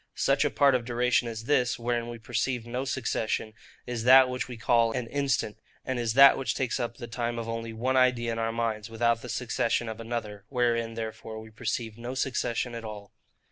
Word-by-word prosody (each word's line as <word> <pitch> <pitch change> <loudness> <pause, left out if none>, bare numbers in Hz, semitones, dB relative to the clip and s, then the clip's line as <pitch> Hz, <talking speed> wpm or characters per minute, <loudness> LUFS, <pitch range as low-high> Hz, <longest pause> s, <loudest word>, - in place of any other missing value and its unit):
Such - - +3
a - - +2
part 140 -1 +4
of 125 -2 +1
duration 120 0 +1
as 115 -1 -5
this, 125 -2 +2
wherein 120 0 -2
we 120 - -6
perceive 120 +1 -2
no 125 +3 -3
succession, 115 -4 -2 0.3
is 120 -2 -4
that 130 +1 +8
which 125 0 -3
we 125 -2 -8
call 115 0 +3
an 125 -1 -2
INSTANT, 135 -4 -1 0.3
and 130 -2 -2
is 115 -1 -1
that 140 0 +8
which 135 - -1
takes 130 -1 -1
up 120 -1 -3
the 120 - -6
time 120 0 -3
of 115 -1 -4
only 115 0 -4
one 125 +4 -1
idea 125 -2 +3
in 115 - -3
our 115 0 0
minds, 115 -2 -2
without 115 0 +1
the 125 - -8
succession 120 -1 0
of 110 0 -6
another; 115 -3 -5
wherein, 115 -3 0
therefore, 110 0 -6
we 110 0 -11
perceive 110 0 -4
no 120 +2 -5
succession 120 -2 -1
at 115 -1 -6
all. 105 -2 -8
120 Hz, 210 wpm, -28 LUFS, 115-125 Hz, 0.3 s, that